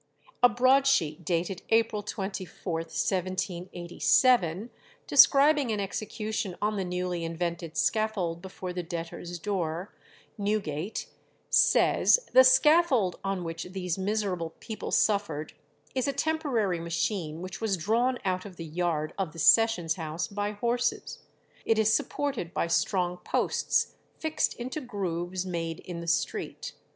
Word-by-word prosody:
A 245 - +8
broadsheet 245 - +3
dated 175 +2 -1
April 225 -2 +2
24th, 195 -2 -6 0.2
1787, 185 +3 +1 0.3
describing 285 -1 +6
an 210 - -1
execution 210 -1 -3
on 210 +1 0
the 195 - -1
newly 180 -1 -3
invented 170 0 -4
scaffold 200 -7 0
before 185 -1 -7
the 180 - -3
debtors' 170 +1 -6
door, 175 -1 -3 0.5
Newgate, 200 -3 -2 0.5
says, - - +4
"The 260 - +9
scaffold 260 - +4
on 195 -2 -2
which 165 0 -5
these 180 -1 -4
miserable 190 -5 -2
people 220 -2 -6
suffered 180 -8 0 0.4
is 260 +1 0
a 280 - 0
temporary 275 - 0
machine 165 -1 -2
which 185 +2 -7
was 210 -4 0
drawn 235 +9 +1
out 185 -1 0
of 200 -3 -10
the 165 - -7
yard 160 -1 -2
of 180 -6 -2
the - - -12
sessions 170 +2 +4
house 160 0 -3
by 205 0 -3
horses;... 240 +3 -1 0.4
it 225 - +2
is 220 0 +3
supported 275 - -2
by - - +1
strong 180 +1 0
posts - - 0 0.2
fixed 315 -1 -1
into 255 +5 -5
grooves 185 - -3
made 165 -2 -3
in 175 -2 -7
the 170 - -8
street 170 - -2
190 Hz, 130 wpm, -28 LUFS, 170-225 Hz, 0.5 s, The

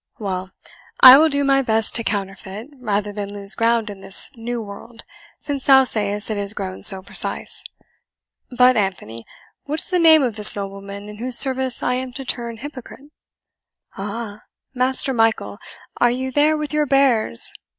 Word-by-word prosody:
Well, 190 -4 -5 0.5
I 260 +1 +11
will 320 +1 +4
do 285 -1 0
my 275 0 +2
best 220 -3 0
to 230 - +1
counterfeit, 200 +2 -5
rather 210 -3 -2
than 200 -1 -6
lose 200 0 -1
ground 230 -1 0
in 200 -2 -9
this 195 0 +2
new 235 +1 -5
world, 225 +2 -11 0.4
since 280 -2 -5
thou 265 -1 +7
sayest 210 -3 -1
it 215 - -3
is 200 +1 -2
grown 190 -2 -6
so 190 -2 +4
precise. - - -1 0.9
But, 250 0 +4
Anthony, 150 - -4 0.4
what 300 +2 -3
is - - -10
the 360 - +1
name 320 -3 +6
of 235 -4 -2
this 210 0 +4
nobleman, 200 0 -8
in 210 0 -10
whose 245 +2 -1
service 260 -1 0
I 250 - 0
am 255 0 -4
to 270 +1 -8
turn 235 -2 -4
hypocrite?" 280 +2 -11 0.8
"Aha! 205 +1 -7 0.3
Master 260 +1 -1
Michael, 225 -2 0 0.4
are 240 - +3
you 260 +2 -3
there 300 +3 +2
with 300 0 -5
your 300 -1 0
bears?" 260 - +2
230 Hz, 170 wpm, -20 LUFS, 205-265 Hz, 0.9 s, I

